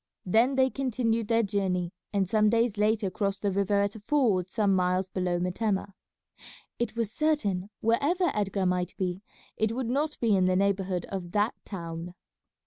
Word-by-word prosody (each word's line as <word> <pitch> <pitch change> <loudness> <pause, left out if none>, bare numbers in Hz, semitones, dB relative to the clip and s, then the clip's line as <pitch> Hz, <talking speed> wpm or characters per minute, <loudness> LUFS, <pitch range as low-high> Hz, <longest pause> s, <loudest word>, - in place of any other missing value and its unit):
Then 230 +8 +3
they 260 0 +3
continued 230 -4 -1
their 230 +1 +3
journey, 190 -3 -1 0.2
and 195 -2 +1
some 215 +2 +3
days 230 -1 +2
later 210 -1 +1
crossed 195 +1 -2
the 200 - +1
river 200 +1 +1
at 200 0 -1
a - - -8
ford 210 -6 +1
some 205 -3 +2
miles 185 +1 +1
below 180 -2 -1
Metemmeh. 195 +2 -1 0.9
It 235 -2 -2
was 230 -3 -1
certain, 210 -11 0
wherever 290 +11 +2
Edgar 195 -2 -1
might 180 0 0
be, 185 0 -2 0.4
it 220 0 +1
would 245 -1 -2
not 295 +3 -1
be 225 -4 +3
in 185 -1 +3
the 185 0 +2
neighbourhood 190 -2 0
of 180 -3 -5
that 210 +2 +2
town. 170 -2 -6
200 Hz, 170 wpm, -28 LUFS, 185-230 Hz, 0.9 s, Then